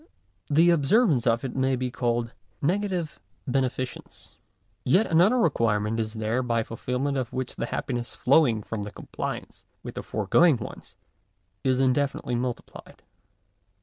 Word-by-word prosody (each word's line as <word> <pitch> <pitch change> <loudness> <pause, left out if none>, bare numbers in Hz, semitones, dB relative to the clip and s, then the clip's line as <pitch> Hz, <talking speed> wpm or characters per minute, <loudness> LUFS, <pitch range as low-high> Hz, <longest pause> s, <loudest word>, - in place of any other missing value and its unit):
The 165 +4 +5
observance 155 - +3
of 115 +2 +2
it 130 - -5
may 130 0 +1
be 125 0 -3
called 120 -1 -1 0.3
negative 180 0 -1 0.3
beneficence. 130 -1 -3 0.4
Yet 185 - +4
another 180 +9 +4
requirement 115 - +1
is 110 0 -3
there 110 +3 0
by 115 -2 0
fulfilment 125 +5 -2
of 125 -1 -4
which 130 -1 -4
the 115 - -3
happiness 120 -2 -3
flowing 125 -5 +3
from 105 -1 -4
compliance 105 - -6 0.2
with - - -7
the - - -5
foregoing 130 - +3
ones 110 - -9 0.7
is 130 -1 +2
indefinitely 135 -1 +1
multiplied. 120 0 -5
130 Hz, 130 wpm, -26 LUFS, 115-145 Hz, 0.7 s, The